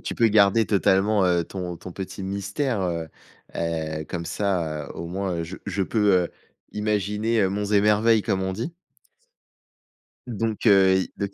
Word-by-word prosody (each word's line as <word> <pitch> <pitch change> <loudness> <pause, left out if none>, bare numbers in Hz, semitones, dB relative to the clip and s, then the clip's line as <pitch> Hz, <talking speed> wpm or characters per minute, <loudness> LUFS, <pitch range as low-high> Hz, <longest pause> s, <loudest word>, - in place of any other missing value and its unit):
tu - - -5
peux 115 - +4
garder 105 +1 +4
totalement, 100 0 +3
heu, 90 -2 +2
ton 90 -1 -6
ton 90 +1 -10
petit 95 +1 -6
mystère, 100 +4 -2
heu 85 -3 -2 0.5
heu, 80 -2 -3
comme 85 -1 -4
ça, 85 -6 -2
heu, - - -8
au 85 - -6
moins 90 -2 -3
je 90 +3 -8
je 100 -1 -2
peux, 105 0 +2
heu, - - -8 0.4
imaginer, 105 +2 0
heu, 95 - +3
monts 100 +1 -3
et 105 -1 +4
merveilles, 105 +1 +3
comme 95 -1 -1
on 95 - -2
dit. 115 - -5 1.5
Donc, 115 -1 -3
heu, 95 -2 +5 0.2
donc 100 -1 -2
100 Hz, 165 wpm, -24 LUFS, 90-105 Hz, 1.5 s, heu